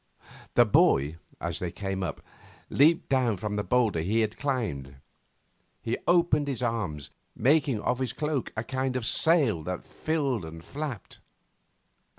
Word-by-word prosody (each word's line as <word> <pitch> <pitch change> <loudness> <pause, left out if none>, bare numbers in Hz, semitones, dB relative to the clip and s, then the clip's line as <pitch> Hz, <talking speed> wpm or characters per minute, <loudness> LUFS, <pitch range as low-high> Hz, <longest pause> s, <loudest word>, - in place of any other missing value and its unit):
The 120 - +7
boy, 75 -7 +3 0.2
as 85 -1 -3
they 90 - -2
came 95 +1 -4
up, 85 -5 -4 0.5
leaped 160 +6 +4
down 125 -6 +2
from 105 +1 -3
a - - -1
boulder 115 -8 +2
he 105 +7 +1
had 110 0 -1
climbed. 100 - -3 0.8
He 115 - -2
opened 170 -4 +3
his 130 -3 -2
arms, 80 - -2 0.2
making 135 -2 +2
of 125 +3 0
his 130 -3 -1
cloak 150 -3 -2
a 110 - -1
kind 130 +1 -2
of 125 -3 -2
sail 140 - +3
that 90 -1 -4
filled 140 - -1
and 80 +1 -9
flapped. 140 - -6
115 Hz, 150 wpm, -28 LUFS, 95-135 Hz, 0.8 s, The